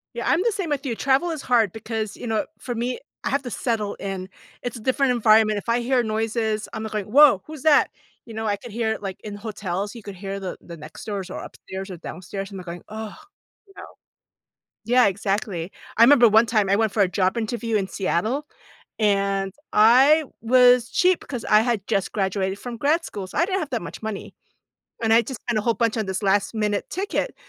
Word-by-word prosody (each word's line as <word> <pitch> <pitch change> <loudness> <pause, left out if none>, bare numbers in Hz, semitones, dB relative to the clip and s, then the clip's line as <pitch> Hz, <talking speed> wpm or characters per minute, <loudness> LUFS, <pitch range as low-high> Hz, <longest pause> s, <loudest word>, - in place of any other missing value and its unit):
Yeah, - - -3
I'm 340 - +3
the 465 - +2
same 385 -5 -3
with 285 -1 -2
you. 240 -4 -2
Travel 275 +8 +2
is 315 -3 -4
hard 230 -7 +2
because, 220 -1 -4
you 245 - -7
know, 220 -1 0
for 245 - -5
me, 245 +2 -2 0.2
I - - -1
have 280 +1 0
to 250 - -5
settle 215 -1 -2
in. 190 -1 -5 0.3
It's 245 0 -4
a - - -7
different 260 +3 +2
environment. 215 -2 +4
If 205 - -6
I 235 +1 +3
hear 245 +1 +1
noises, 220 0 -1
I'm 220 - -4
like 220 - -5
going 210 -2 -2
"Woah, 275 -1 +6
who's 310 -2 -9
that?" 305 -2 +5 0.4
You 230 - -10
know, 220 0 -4
I 205 -1 +1
could 235 +3 -11
hear 225 0 -1
it, - - -8
like, 195 -2 -5
in 210 -1 -6
hotels. 205 -1 -4
You 230 - -10
could 200 -1 -8
hear 195 +1 -5
the 190 -2 -5
the 170 - -10
next 155 +1 -11
doors 200 -4 -4
or - - -6
upstairs 190 +1 -8
or 185 - -7
downstairs 190 +4 -7
and 195 - -7
they're 180 - -10
going, 175 0 -7
"Ugh," 215 0 -6 0.5
you 390 - -20
know. - - -8 1.0
Yeah, 245 +2 +5
exactly. 195 -3 -2 0.3
I 225 - +7
remember 245 -1 +7
one 220 +2 +5
time 215 -4 +1
I 200 - +4
went 220 -1 +1
for 210 - +1
a - - +2
job 185 +3 0
interview 230 0 -2
in 195 -2 -2
Seattle, 215 - -1 0.5
and 195 -2 +1 0.2
I 260 +9 +6 0.2
was 250 0 +5
cheap 365 -1 +3
because 245 -5 -6
I 210 0 +5
had 225 -4 -1
just 195 - 0
graduated 190 -1 -1
from 245 -2 -6
grad 305 +7 +2
school, 195 -2 -6
so - - -7
I 335 - +4
didn't 385 0 -1
have 310 -6 -5
that 240 - -1
much 170 - -8
money. 215 -2 -5 0.7
And 225 -1 +2
I 230 +1 +6
just 240 0 -7
spent 235 -3 -1
a - - -1
whole 230 +1 +1
bunch 230 -1 0
on 215 - -1
this 190 +2 -3
last 200 +2 +1
minute 210 -2 -1
ticket. 400 +6 -2
220 Hz, 225 wpm, -23 LUFS, 200-245 Hz, 1.0 s, I